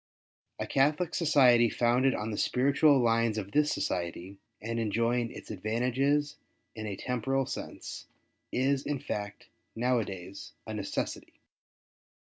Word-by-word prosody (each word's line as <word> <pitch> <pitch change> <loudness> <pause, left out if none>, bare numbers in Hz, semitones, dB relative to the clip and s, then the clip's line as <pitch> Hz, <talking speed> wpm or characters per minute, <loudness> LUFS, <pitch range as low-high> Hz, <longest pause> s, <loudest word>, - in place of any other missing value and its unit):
A - - -3
Catholic 150 +5 +1
Society 125 -8 +5
founded 125 +4 +2
on 105 +1 -3
the 105 - -4
spiritual 140 +3 +4
lines 115 -2 +2
of 100 -2 -4
this 150 +3 +3
Society, 90 +2 -3 0.2
and 115 +2 -3
enjoy 115 +2 +1
ing 115 -1 -3
its - - -9
advantages 125 +8 0 0.4
in 110 -1 -6
a 100 - -3
temporal 130 +5 -1
sense, - - -7 0.4
is 135 +2 +1
in 145 - -2
fact, 105 -5 -6 0.3
now 125 +2 +2
a - - 0
days, 95 0 -8
a 110 - -6
necessity. 105 -2 -4
120 Hz, 135 wpm, -30 LUFS, 105-135 Hz, 0.4 s, Society